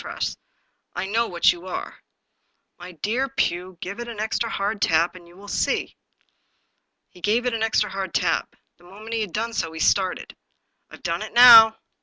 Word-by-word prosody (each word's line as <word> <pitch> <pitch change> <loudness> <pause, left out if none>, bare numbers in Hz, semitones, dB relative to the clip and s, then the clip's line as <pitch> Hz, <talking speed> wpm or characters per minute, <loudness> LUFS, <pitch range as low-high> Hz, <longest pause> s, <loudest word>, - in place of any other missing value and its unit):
Tress, - - -4 0.6
I - - -3
know 225 +4 0
what 175 -1 +3
you 175 +1 -12
are." - - -6 0.4
" - - -49
My 180 +1 -10
dear 225 - -2
Pugh, 185 -9 -2
give 200 +4 -6
it 240 - -6
an 230 -3 -8
extra 220 +2 -2
hard 205 0 -3
tap, 165 +2 +2
and 180 -2 -14
you 170 - -18
will 200 +1 -14
see." - - -2 1.2
He 180 - -18
gave 225 +5 0
it 250 - 0
an 225 - -3
extra 215 -2 0
hard 195 -2 -4
tap. 170 -2 -1 0.2
The 175 - -24
moment 210 +5 -11
he 225 - -1
had 210 -4 -4
done 230 +4 -3
so, 165 -7 -2
he 160 - -8
started. 185 +2 0 0.3
" - - -49
Fve - - -14
done - - -2
it - - -7
now." 230 -2 +9
205 Hz, 200 wpm, -23 LUFS, 180-225 Hz, 1.2 s, now